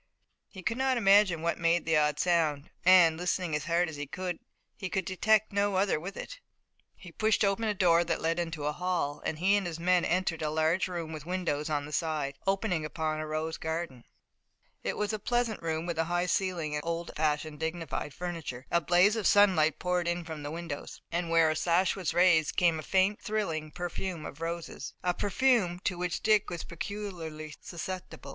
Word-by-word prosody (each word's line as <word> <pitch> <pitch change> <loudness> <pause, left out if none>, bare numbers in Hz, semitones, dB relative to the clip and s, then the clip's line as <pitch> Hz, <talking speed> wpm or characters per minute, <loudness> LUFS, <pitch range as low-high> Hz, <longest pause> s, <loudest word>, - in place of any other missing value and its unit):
He 190 -3 -11
could 235 +5 -1
not 265 -1 +2
imagine 195 -6 +4
what 170 - 0
made 170 0 +2
the 160 0 +2
odd 150 -1 +2
sound, 160 -5 +1
and, 175 -3 +6
listening 175 -2 -1
as 150 - -3
hard 170 +2 +2
as 160 -2 -7
he 145 0 -5
could, 180 +2 -4 0.4
he 190 - -5
could 190 -1 -1
detect 215 +3 +2
no 200 0 +1
other 190 -4 +2
with 185 +5 -7
it. - - -7 0.6
He 180 - -12
pushed 215 +3 +2
open 200 +3 +1
a 210 -1 0
door 170 -3 +4
that 170 - -1
led 165 +2 0
into 165 -3 -3
the 150 +1 0
hall 175 -4 -2
and 155 - -2
he 190 +5 +3
and 200 -3 0
his 165 -1 -5
men 180 +1 +3
entered 175 -2 0
a 155 - 0
large 160 +4 +1
room 170 -3 -5
with 155 0 -8
windows 170 -5 -1
on 145 -2 -1
the 150 - -9
side, 150 -3 -1
opening 195 -4 +1
upon 155 0 -2
a 155 - -4
rose 155 +1 -3
garden. 160 -6 -4 0.8
It - - -2
was 210 +1 -1
a 215 - -2
pleasant 240 0 0
room 160 0 -2
with 170 -2 -3
a 165 - +2
high 175 +1 0
ceiling, 180 -4 -1
and 150 0 -2
old 170 0 -3
fashioned, 150 0 -1
dignified 160 -2 -3
furniture. 165 -7 -6
A 170 - +3
blaze 180 +7 +4
of 220 -3 +1
sunlight 180 -7 +4
poured 180 -1 0
in 175 0 -1
from 160 -2 -6
the 145 - -5
windows, 165 -2 -6
and, 170 0 -1
where 165 -1 +4
a - - -1
sash 175 +3 +2
was 185 -4 -2
raised, 175 -4 +4
came 170 -3 +3
the - - -4
faint, 190 +5 +1
thrilling 165 -8 -2
perfume 175 +1 -4
of 145 - -9
roses, 165 -4 -5
a 180 -1 +2
perfume 205 -3 +2
to 185 - 0
which 175 0 -3
Dick 215 -1 +3
was 170 -2 -5
peculiarly 170 -5 -6
susceptible. 185 +1 -7
170 Hz, 205 wpm, -30 LUFS, 160-185 Hz, 0.8 s, and